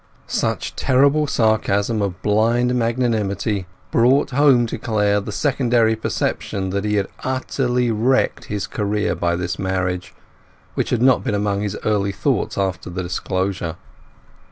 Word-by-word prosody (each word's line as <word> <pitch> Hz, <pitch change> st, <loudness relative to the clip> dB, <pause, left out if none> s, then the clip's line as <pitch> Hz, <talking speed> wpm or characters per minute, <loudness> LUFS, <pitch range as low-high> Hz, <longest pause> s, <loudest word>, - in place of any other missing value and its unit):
Such -, -, -2 dB
terrible 140 Hz, +3 st, +3 dB
sarcasm 110 Hz, -2 st, +1 dB
of 95 Hz, -2 st, -3 dB
blind 115 Hz, +4 st, +2 dB
magnanimity 110 Hz, -5 st, 0 dB, 0.2 s
brought 130 Hz, +4 st, +3 dB
home 135 Hz, -3 st, +4 dB
to 115 Hz, -, -5 dB
Clare 105 Hz, -2 st, +1 dB
the -, -, -6 dB
secondary 120 Hz, -5 st, +2 dB
perception 95 Hz, -3 st, -2 dB
that 100 Hz, +1 st, -2 dB
he 105 Hz, 0 st, +1 dB
had 100 Hz, -2 st, +1 dB, 0.2 s
utterly 125 Hz, -2 st, 0 dB
wrecked 120 Hz, +5 st, +1 dB
his 105 Hz, -1 st, -3 dB
career 105 Hz, -3 st, -1 dB
by 85 Hz, 0 st, 0 dB
this 85 Hz, 0 st, -3 dB
marriage, 95 Hz, -1 st, -2 dB, 0.6 s
which -, -, -1 dB
had 120 Hz, -1 st, +1 dB
not 130 Hz, -1 st, +4 dB
been 105 Hz, -, -1 dB
among 100 Hz, -1 st, 0 dB
his 105 Hz, -1 st, -3 dB
early 100 Hz, -2 st, +1 dB
thoughts 95 Hz, -, -1 dB
after 95 Hz, -2 st, -2 dB
the 90 Hz, +1 st, -4 dB
disclosure. 95 Hz, -1 st, -2 dB
105 Hz, 140 wpm, -20 LUFS, 95-120 Hz, 0.6 s, home